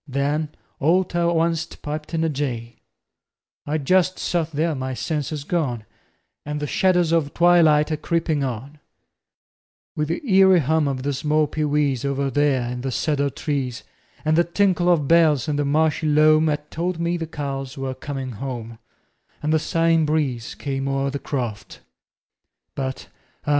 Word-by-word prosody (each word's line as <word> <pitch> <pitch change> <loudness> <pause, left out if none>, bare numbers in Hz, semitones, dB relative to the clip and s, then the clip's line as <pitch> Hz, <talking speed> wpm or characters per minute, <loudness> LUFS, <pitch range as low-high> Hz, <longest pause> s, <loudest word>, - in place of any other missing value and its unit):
Then 145 +3 -1 0.3
all 170 +5 +3
ter 175 -1 -1
onct 165 -1 0
piped 150 +2 -5
in 160 - +1
a - - +2
jay. 120 -5 -4 0.9
I 150 +2 0
just 185 +5 +2
sot 170 -2 -1
there 155 +3 0
with 150 -4 -3
my 130 0 -3
senses 150 0 -3
gone, 140 -9 -2 0.6
And 150 0 -4
the 150 - -2
shadders 180 +1 +2
of 160 -4 +1
twilight 160 -3 +5
a 155 - 0
creepin' 160 -1 -1
on, 135 +4 -5 1.2
With 150 0 -1
the 165 - -3
eerie 190 -3 +6
hum 155 +2 +1
of 130 -2 -2
the 145 +1 -1
small 150 +3 +1
pee 155 +1 -2
wees, 145 -4 +1
Over 140 0 -1
there 135 -3 +1
in 125 0 -5
the 135 +1 -3
cedar 140 +1 0
trees, 135 -4 -3 0.4
And 155 0 +3
the 170 - +5
tinkle 180 0 +2
of 150 -5 +2
bells 160 -3 +4
in 150 -1 -1
the 145 - 0
marshy 155 +2 +1
loam 155 +1 +4
'At 150 0 -3
told 175 +1 -2
me 170 +1 0
the 165 -2 -4
cows 140 -2 -5
were 135 -1 -3
coming 135 0 -5
home, 115 -1 -6 0.6
And 155 +1 +1
the 160 - +4
sighing 165 0 +2
breeze 140 -7 -1
came 135 -1 -3
o'er 135 0 0
the 140 - -4
croft, 120 -9 -5 0.9
But 130 -1 -4 0.4
ah! - - -3
150 Hz, 170 wpm, -22 LUFS, 135-165 Hz, 1.2 s, eerie